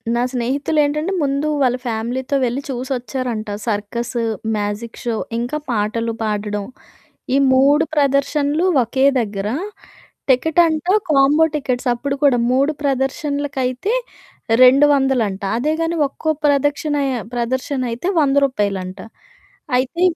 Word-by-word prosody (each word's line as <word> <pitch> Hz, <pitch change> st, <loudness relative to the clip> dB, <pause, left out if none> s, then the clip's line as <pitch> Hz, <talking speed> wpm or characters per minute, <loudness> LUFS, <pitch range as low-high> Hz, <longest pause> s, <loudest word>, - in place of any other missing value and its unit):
నా 240 Hz, -, +1 dB
స్నేహితులేంటంటే, 290 Hz, +6 st, 0 dB
ముందు 280 Hz, +2 st, 0 dB
వాళ్ళ 250 Hz, -2 st, +3 dB
ఫ్యామిలీతో 245 Hz, +4 st, -2 dB
వెళ్లి 250 Hz, +3 st, -2 dB
చూసొచ్చారంట. 250 Hz, -3 st, -3 dB, 0.2 s
సర్కస్, 230 Hz, +3 st, -3 dB, 0.4 s
మ్యాజిక్ 205 Hz, +3 st, -4 dB
షో, 235 Hz, -2 st, -1 dB, 0.2 s
ఇంకా 245 Hz, +6 st, -2 dB
పాటలు 230 Hz, +1 st, -1 dB
పాడడం 210 Hz, -1 st, -2 dB, 0.7 s
ఈ -, -, +4 dB, 0.2 s
3 280 Hz, +4 st, +4 dB
ప్రదర్శనలు 285 Hz, +2 st, +1 dB, 0.2 s
ఒకే 260 Hz, +4 st, 0 dB, 0.2 s
దగ్గర. 205 Hz, -2 st, -3 dB, 0.8 s
టికెట్ 315 Hz, +6 st, +3 dB
అంట, 315 Hz, -1 st, -1 dB, 0.3 s
కాంబో 290 Hz, +2 st, +5 dB
టికెట్స్. 260 Hz, -4 st, -1 dB
అప్పుడు 275 Hz, +4 st, -3 dB
కూడా 265 Hz, -4 st, +4 dB
3 275 Hz, +4 st, +2 dB
ప్రదర్శనలకైతే 275 Hz, -, -1 dB, 0.7 s
రెండు 270 Hz, +3 st, +7 dB
వందలంట. 245 Hz, -8 st, 0 dB, 0.2 s
అదే 300 Hz, +6 st, 0 dB
గాని 330 Hz, +1 st, -1 dB
ఒక్కో 315 Hz, +3 st, -3 dB, 0.2 s
ప్రదక్షిణ 290 Hz, +1 st, +1 dB, 0.4 s
ప్రదర్శన 255 Hz, +3 st, -2 dB
అయితే 240 Hz, +10 st, -3 dB
100 280 Hz, -1 st, +2 dB
రూపాయలంట. 200 Hz, -6 st, -3 dB, 0.8 s
అయితే 265 Hz, +8 st, -1 dB
260 Hz, 110 wpm, -19 LUFS, 235-285 Hz, 0.8 s, రెండు